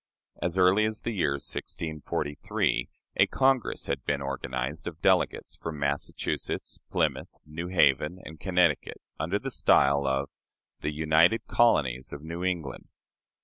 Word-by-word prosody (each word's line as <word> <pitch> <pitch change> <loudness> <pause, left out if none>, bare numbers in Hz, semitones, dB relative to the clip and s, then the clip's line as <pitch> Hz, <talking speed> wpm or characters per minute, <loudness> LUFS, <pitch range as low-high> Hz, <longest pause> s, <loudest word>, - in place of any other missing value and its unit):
As 85 +1 -1
early 95 +4 +5
as 110 0 -3
the 120 - -1
year 85 -8 +1
1643 75 +1 -2 0.3
a - - +6
Congress 130 -2 +1
had - - -2
been 70 - 0
organized 70 +1 -4
of 80 -2 -6
delegates - - +1
from 80 -2 -5
Massachusetts, 70 0 -3
Plymouth, - - -1
New 80 +3 -6
Haven, 75 -1 +3
and 80 0 -10
Connecticut, 90 -5 +1 0.2
under 85 +6 0
the 135 +5 -5
style 70 - +4
of 65 +1 0 0.5
"The 75 - -2
United 80 +7 +3
Colonies 65 - +2
of 70 - -8
New 85 +2 -5
England." 85 -6 -3
80 Hz, 135 wpm, -28 LUFS, 70-90 Hz, 0.5 s, a